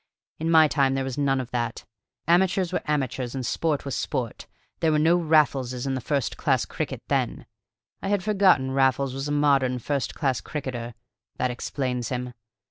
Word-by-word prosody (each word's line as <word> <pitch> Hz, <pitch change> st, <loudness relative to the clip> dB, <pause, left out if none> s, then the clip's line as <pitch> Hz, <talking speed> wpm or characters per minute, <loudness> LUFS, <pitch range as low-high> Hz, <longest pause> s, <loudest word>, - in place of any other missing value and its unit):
In 160 Hz, +1 st, -1 dB
my 160 Hz, -1 st, +7 dB
time 135 Hz, -2 st, +2 dB
there 135 Hz, -, 0 dB
was 130 Hz, +1 st, -4 dB
none 135 Hz, -2 st, +2 dB
of 125 Hz, -2 st, -5 dB
that. 120 Hz, -2 st, -3 dB, 0.4 s
Amateurs 180 Hz, +1 st, +3 dB
were -, -, 0 dB
amateurs 135 Hz, -4 st, -1 dB
and 130 Hz, -2 st, -3 dB
sport 150 Hz, +3 st, -1 dB
was 140 Hz, -, -3 dB
sport; 125 Hz, -5 st, -3 dB, 0.3 s
there 160 Hz, -, +2 dB
were 155 Hz, -, +3 dB
no 160 Hz, +3 st, +4 dB
Raffleses 140 Hz, -7 st, +2 dB
in 135 Hz, -1 st, -1 dB
first 135 Hz, 0 st, -1 dB
class -, -, +1 dB
cricket -, -, -5 dB
then. -, -, -1 dB, 0.6 s
I -, -, -4 dB
had 200 Hz, -2 st, +1 dB
forgotten 190 Hz, -10 st, +3 dB
Raffles 135 Hz, 0 st, +2 dB
was 135 Hz, +2 st, -4 dB
a -, -, -2 dB
modern 140 Hz, -3 st, +3 dB
first 140 Hz, +3 st, -2 dB
class 135 Hz, -5 st, 0 dB
cricketer: 120 Hz, -6 st, -5 dB, 0.4 s
that 130 Hz, -, 0 dB
explains 125 Hz, -1 st, -3 dB
him. 125 Hz, -1 st, -4 dB
135 Hz, 175 wpm, -25 LUFS, 130-155 Hz, 0.6 s, my